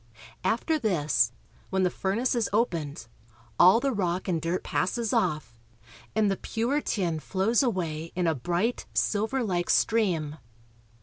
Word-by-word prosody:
After 310 +8 +1
this, 150 - +2 0.4
when 190 0 +1
the 180 - +2
furnace 225 +7 0
is 235 -3 0
opened, 170 - -1 0.5
all 185 +6 +7
the 275 +2 0
rock 185 -5 -1
and 170 -4 0
dirt 170 +3 -2
passes 225 +4 -1
off, 150 -10 -1 0.6
and 215 -2 +3
the 195 - -1
pure 245 +6 -1
tin 175 - -1
flows 200 +8 +1
away 165 - -2
in 180 0 0
a 165 - +3
bright, 175 - -1
silverlike 210 -4 0
stream. 170 -10 +1
185 Hz, 135 wpm, -27 LUFS, 165-225 Hz, 0.6 s, all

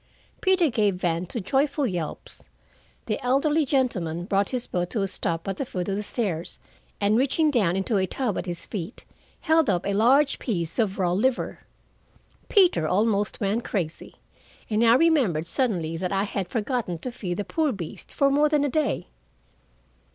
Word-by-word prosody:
Peter 375 -3 +3
gave 210 -4 +2
vent 175 -1 -1
to 235 - -3
joyful 275 +7 +1
yelps. 175 - -5 0.6
The 215 +5 -3
elderly 285 +4 +2
gentleman 185 - 0
brought 195 +1 +1
his 250 -2 -3
boat 175 -1 -2
to 215 -4 -1
a - - 0
stop 170 -2 -3
at 195 -1 -2
the - - -1
foot 180 -8 -4
of 195 - 0
the 205 - -2
stairs, 195 -7 -3 0.4
and 205 +1 +2
reaching 280 +5 +2
down 200 -10 +2
into 195 +3 0
a 190 -1 +1
tub 240 -4 -2
at - - -6
his 170 -1 -5
feet, 195 +1 -6 0.4
held 320 -5 +3
up 180 -2 0
a 200 - 0
large 265 +8 +4
piece 170 - -2
of 210 -3 +1
raw 180 -3 +1
liver. 240 +8 0 0.9
Peter 360 - +4
almost 205 +3 +1
went 215 +3 0
crazy, 170 -6 -4 0.6
and 215 +2 +2
I 230 0 +6
remembered 260 - +3
suddenly 175 -7 -1
that 180 +1 -3
I 195 0 +1
had 195 -3 -3
forgotten 225 -5 -2
to 250 +10 -6
feed 180 -7 -4
the 205 - -1
poor 315 -3 0
beast 180 -8 -8
for 275 -1 +2
more 295 +2 +3
than 295 -1 +2
a - - 0
day. 305 +1 0
210 Hz, 180 wpm, -25 LUFS, 180-265 Hz, 0.9 s, I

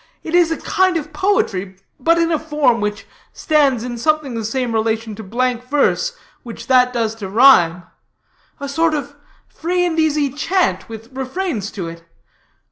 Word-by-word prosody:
It 320 - -6
is 350 -2 +4
a 325 - -1
kind 370 -2 +1
of 305 -1 -6
poetry, 200 - 0 0.2
but 330 +5 +3
in 335 0 +1
a 315 - +1
form 295 -7 +1
which 210 +1 -3 0.3
stands 280 -7 +2
in 240 -1 -5
something 305 0 0
the 225 -1 -3
same 240 +2 -2
relation 220 0 -1
to 215 - -8
blank 245 +4 -1
verse 295 - 0 0.2
which 235 -2 -9
that 250 -1 +4
does 230 -3 -1
to 195 - -4
rhyme. 185 -7 +5 0.8
A 280 - -5
sort 320 +3 +1
of 285 -1 -5 0.3
free 355 +2 -1
and 330 -2 -1
easy 300 -3 +1
chant 345 +4 0
with 225 +3 -10
refrains 265 - -3
to 185 -5 -5
it. 165 0 -9
265 Hz, 170 wpm, -19 LUFS, 225-315 Hz, 0.8 s, rhyme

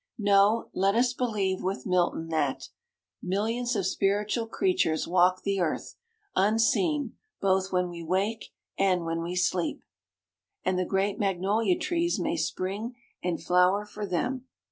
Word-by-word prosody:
No: 205 +1 +3
let 195 +2 +2
us 245 +1 +3
believe, 210 -7 -1
with 190 +2 -3
Milton, 175 -3 0
that 155 -4 -1 0.5
"Millions 225 +6 -1
of 195 -3 0
spiritual 205 +4 0
creatures 355 - +1
walk 180 +1 +3
the 200 -1 0
earth 170 -4 -2 0.4
Unseen, 225 - +2 0.2
both 190 -1 +1
when 180 -1 +1
we 170 -1 -7
wake 190 +7 -1 0.3
and 185 -3 +2
when 165 0 -2
we 175 +2 -4
sleep;" 180 -1 0 0.8
and 185 0 +1
the 185 - 0
great 195 +3 0
magnolia 195 0 +1
trees 345 -1 0
may 320 +1 -1
spring 215 - -3 0.3
and 175 -2 -2
flower 180 +3 +3
for 210 0 -6
them. 250 +8 -2
195 Hz, 140 wpm, -28 LUFS, 180-225 Hz, 0.8 s, No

